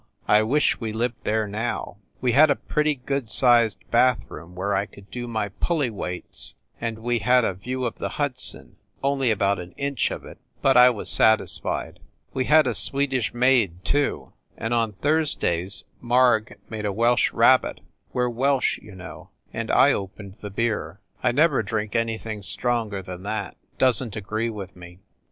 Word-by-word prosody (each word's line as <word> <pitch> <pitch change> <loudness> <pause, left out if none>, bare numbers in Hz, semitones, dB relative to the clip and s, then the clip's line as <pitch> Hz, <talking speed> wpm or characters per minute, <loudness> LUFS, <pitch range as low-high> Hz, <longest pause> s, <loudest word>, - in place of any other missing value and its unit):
I 105 - +5
wish 135 +8 +1
we 115 -2 -3
lived 120 +2 -3
there 110 0 0
now! 105 0 -4 0.2
We 125 - +2
had 150 +6 +6
a 140 - +3
pretty 150 +1 0
good 135 -2 -3
sized 120 -4 +4
bath 125 0 +4
room 85 +2 -11
where 100 +3 -2
I 100 +1 0
could 100 -1 -17
do 120 -1 -5
my 110 -3 -2
pulley 145 - -1
weights, 90 -4 -2 0.3
and 115 -1 -3
we 120 +1 -1
had 125 +3 +3
a - - 0
view 125 +7 -4
of 115 - -4
the - - -3
Hudson 135 -3 -1 0.3
only 135 -2 +1
about 100 -2 +1
one 90 0 -9
inch 140 -3 -1
of - - -7
it, - - -12 0.2
but 135 - +3
I 125 0 +8
was 120 -4 -4
satisfied. 110 -1 +1 0.3
We 130 - -1
had 155 +1 +5
a 125 - 0
Swedish 130 +4 +1
maid, 120 -9 +2
too, 145 0 -1 0.2
and 115 +1 -3
on 115 -2 +1
Thursdays 100 - 0 0.2
Marg 120 -2 +2
made 110 -2 -4
a - - -1
Welsh 120 +4 +2
rabbit, - - +3 0.3
we 125 - 0
re - - +1
Welsh, 130 +3 +1
you 105 - -14
know, 95 0 -11 0.2
and - - -4
I - - +5
opened 100 0 -7
the 105 - -6
beer. 100 -5 -2 0.2
I 125 - +2
never 155 +7 +3
drink 105 -2 -3
anything 115 -2 -2
stronger 105 +1 -2
than 90 -1 -8
that 105 +1 -4 0.2
Doesn 130 -2 +2
t 105 - -8
agree 110 +3 -2
with 100 -4 -8
me. 90 0 -13
115 Hz, 180 wpm, -24 LUFS, 100-125 Hz, 0.3 s, I